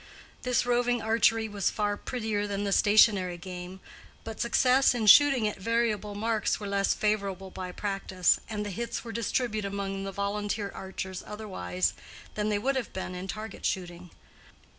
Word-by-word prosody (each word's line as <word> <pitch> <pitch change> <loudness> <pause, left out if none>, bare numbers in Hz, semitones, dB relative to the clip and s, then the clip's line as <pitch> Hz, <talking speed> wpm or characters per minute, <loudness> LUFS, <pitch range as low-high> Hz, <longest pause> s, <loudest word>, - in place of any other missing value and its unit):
This 250 -1 +1
roving 245 0 +2
archery 225 0 +2
was 205 -3 0
far 205 -1 -1
prettier 215 -3 -3
than 200 0 -2
the 200 - -1
stationary 200 -4 +4
game, 180 +1 -8 0.4
but 225 -1 -6
success 250 +2 +4
in 225 -3 -1
shooting 260 +1 +7
at 210 - -4
variable 215 -1 0
marks 220 0 0
were 210 - -6
less 200 0 +1
favored 210 -2 0 0.2
by 185 -1 -5
practice, 195 -2 +1
and 210 -1 -3
the 205 - -4
hits 235 +5 -4
were 230 - -7
distributed 225 -2 -1
among 195 -1 -3
the 195 - -4
volunteer 200 +1 -2
archers 190 -1 -6
otherwise 90 - -2 0.4
than 210 0 -1
they 210 - +1
would 270 +7 0
have 250 - -3
been 185 -1 -4
in 180 +1 -6
target 215 +1 -7
shooting. 180 -1 -3
205 Hz, 160 wpm, -28 LUFS, 195-225 Hz, 0.4 s, shooting